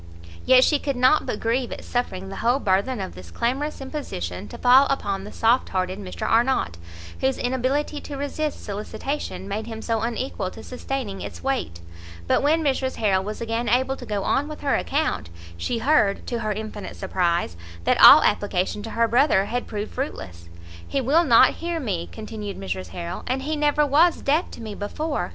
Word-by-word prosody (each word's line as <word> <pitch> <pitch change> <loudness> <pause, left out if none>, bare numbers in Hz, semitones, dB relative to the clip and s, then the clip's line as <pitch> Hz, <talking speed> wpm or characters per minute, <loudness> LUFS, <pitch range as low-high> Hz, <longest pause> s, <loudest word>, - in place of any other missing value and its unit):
Yet 255 0 +7
she 295 +1 +3
could 280 -1 -2
not 255 +5 +3
but 210 - -2
grieve 240 +2 0
at - - -6
suffering 195 -6 -3
the 195 - -7
whole 240 +3 +2
burthen 210 +2 0
of 190 - -5
this 90 -2 -11
clamorous 265 - -2
imposition 105 - -5
to - - -9
fall 260 +3 +6
upon 200 -7 -2
the 210 - -8
soft 230 +3 +2
hearted 185 +1 -2
Mr 190 -3 -5
Arnott, 230 - +2 0.4
whose 265 0 +1
inability 260 +4 -1
to 285 - -7
resist 290 +2 -3
solicitation 215 +2 -4
made 210 +2 -4
him 225 -1 -6
so 225 -2 0
unequal 230 -4 -3
to - - -11
sustaining 250 -5 -5
its - - -8
weight; 260 - -2 0.4
but - - +2
when 315 +3 +2
Mrs 265 -2 0
Harrel 195 -3 +1
was 210 +3 -6
again 230 +1 -1
able 260 +3 +2
to 260 - -10
go 205 -2 -2
on 285 +2 +1
with 305 0 -8
her 280 - +1
account, 295 - -1 0.3
she 85 - -2
heard, 225 -5 +2
to 235 - -3
her 215 -2 -2
infinite 215 0 -6
surprise, 175 - 0 0.3
that - - +2
all - - +11
application 200 0 0
to 225 - -7
her 230 +1 +1
brother 240 -5 +3
had 245 +3 -3
proved 210 0 -5
fruitless. 90 - -6 0.4
"He 275 - -1
will 285 +7 +3
not 235 -5 +6
hear 340 0 -2
me," 190 - -3
continued 215 -2 -7
Mrs 190 -1 -4
Harrel, 170 0 -6
"and 265 +1 -1
he 310 +2 -1
never 295 0 +2
was 315 +5 +3
deaf 305 +6 +1
to - - -10
me 215 -2 -6
before! 290 +10 -3
235 Hz, 190 wpm, -24 LUFS, 200-275 Hz, 0.4 s, all